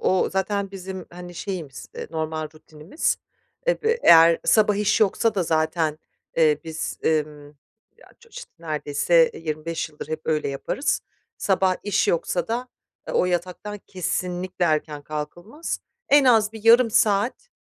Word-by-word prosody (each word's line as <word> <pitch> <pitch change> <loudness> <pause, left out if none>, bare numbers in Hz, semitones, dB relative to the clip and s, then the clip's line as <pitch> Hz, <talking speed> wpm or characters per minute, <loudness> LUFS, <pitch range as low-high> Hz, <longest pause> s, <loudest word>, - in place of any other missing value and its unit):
o 185 - +2
zaten 195 +1 -1
bizim, 190 -2 -7
hani, 175 0 -9
şeyimiz, 170 -8 -6
eee, - - -6
normal 160 -1 -3
rutinimiz. 155 - -3 0.5
Eve 465 -1 +1
eğer 165 0 +7
sabah 210 -2 +4
iş 210 -1 +2
yoksa 220 +1 +2
da 190 - +1
zaten, 160 -1 0 0.4
eee, 155 -3 +4
biz, 160 -1 -5
emm, 150 -2 -1 0.5
ya 480 - -19
ço 470 - -20
iş - - -9
neredeyse, 160 +1 +2
eee, - - -10
25 160 +1 -3
yıldır 150 -1 -10
hep 155 0 -3
öyle 155 -2 0
yaparız. 140 - -1 0.4
Sabah 190 -1 +2
iş 205 -2 +1
yoksa 175 +3 0
da, 245 +2 -2 0.4
ııı, - - -1
o - - +3
yataktan 180 +4 -3
kesinlikle 180 0 -2
erken 155 -2 -1
kalkılmaz. 175 - -5 0.3
En 285 -1 +6
az 225 -4 +4
bir 220 -1 -10
yarım 230 +1 +6
saat, 220 - +1
180 Hz, 145 wpm, -24 LUFS, 155-210 Hz, 0.5 s, eğer